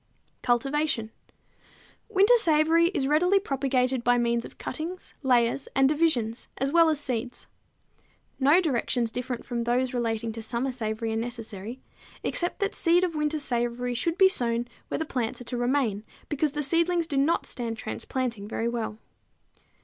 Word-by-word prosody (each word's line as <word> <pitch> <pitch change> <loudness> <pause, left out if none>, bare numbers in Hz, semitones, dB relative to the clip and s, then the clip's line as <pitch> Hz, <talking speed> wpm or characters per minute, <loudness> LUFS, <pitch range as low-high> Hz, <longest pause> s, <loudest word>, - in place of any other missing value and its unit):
Cultivation. 255 -1 0 1.0
Winter 420 +3 +5
savory 325 -3 +4
is 320 -7 -1
readily 345 +7 +3
propagated 265 -6 0
by 245 0 +4
means 235 0 +1
of - - -11
cuttings, 335 +7 -6
layers 250 -1 +2
and 270 0 +5
division 290 -7 +2 0.2
as 270 +2 0
well 335 0 +5
as 310 -2 +1
seeds. 245 -3 -3 0.9
No 285 +6 +5
directions 245 -7 0
different 250 0 -4
from 240 -2 -2
those 245 +2 0
relating 230 -2 -1
to 225 +1 -7
summer 240 +4 -2
savory 225 -2 -3
are - - -1
necessary, 230 0 -5 0.4
except 350 +4 -1
that 400 0 0
seed 345 +1 +3
of 355 -2 0
winter 300 0 0
savory 245 -2 -1
should 335 +8 -1
be 385 - +7
sown 240 -8 0 0.2
where - - -2
the 320 - -2
plants 245 -6 -3
are - - -8
to 245 - -5
remain, 245 -4 0 0.3
because 295 -1 0
the 295 - -1
seedlings 335 +3 +2
do 310 -3 -4
not 280 +5 +2
stand 230 -2 -4
transplanting 235 -4 -4
very 225 +1 -2
well. 230 -2 -3
255 Hz, 155 wpm, -27 LUFS, 235-310 Hz, 1.0 s, be